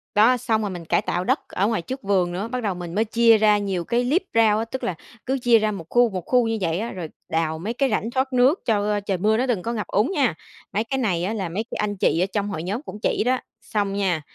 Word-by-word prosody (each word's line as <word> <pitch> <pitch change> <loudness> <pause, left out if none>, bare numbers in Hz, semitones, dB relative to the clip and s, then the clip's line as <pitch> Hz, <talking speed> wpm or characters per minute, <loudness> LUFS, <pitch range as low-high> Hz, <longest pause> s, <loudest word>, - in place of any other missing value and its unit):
Đó, 225 +5 +5
xong 220 -2 0
rồi 210 - -2
mình 175 -3 -7
cải - - +2
tạo 180 - -2
đất - - +1
ở 200 - 0
ngoài 220 -5 0
trước 260 +10 -6
vườn 190 -3 +1
nữa, 190 +5 -3
bắt 250 0 -4
đầu 200 -3 0
mình 175 -1 -7
mới 220 +2 +2
chia 230 0 +5
ra 210 -1 +4
nhiều 195 -4 -2
cái 235 +6 0
liếp 290 +10 +2
rau 220 -2 +4
á, 225 - -1
tức 260 +3 -6
là 185 - -1 0.3
cứ 265 +1 0
chia 235 -2 +5
ra 215 0 0
1 190 -5 -6
khu, 245 -1 +4
1 185 -3 -4
khu 250 -2 +3
như 225 0 -1
vậy 170 -1 0
á, 230 +3 -3
rồi 180 -4 -5 0.2
đào 160 -1 -1
mấy 210 +7 -3
cái 270 +2 +1
rãnh 225 -1 -1
thoát 260 +1 -1
nước 255 +7 +4
cho 210 -2 +1
trời 200 -2 -2
mưa 215 +4 +2
nó 250 - +1
đừng 240 -8 0
có 230 +5 -3
ngập 215 -3 -3
úng 215 - +1
nha. 275 - +2 0.4
Mấy 210 +4 +1
cái 250 +4 -3
này 190 -9 0
á 200 +5 -1
là 195 -6 -3
mấy 195 +7 -2
cái - - -4
anh 205 -1 -1
chị 165 - +2
ở - - +2
trong 205 -1 -1
hội 160 -5 -4
nhóm 200 +8 -3
cũng 255 - -8
chỉ - - +1
đó. 255 +2 +1 0.2
Xong 205 -3 -2
nha, 190 -5 0
215 Hz, 290 wpm, -23 LUFS, 190-235 Hz, 0.4 s, Đó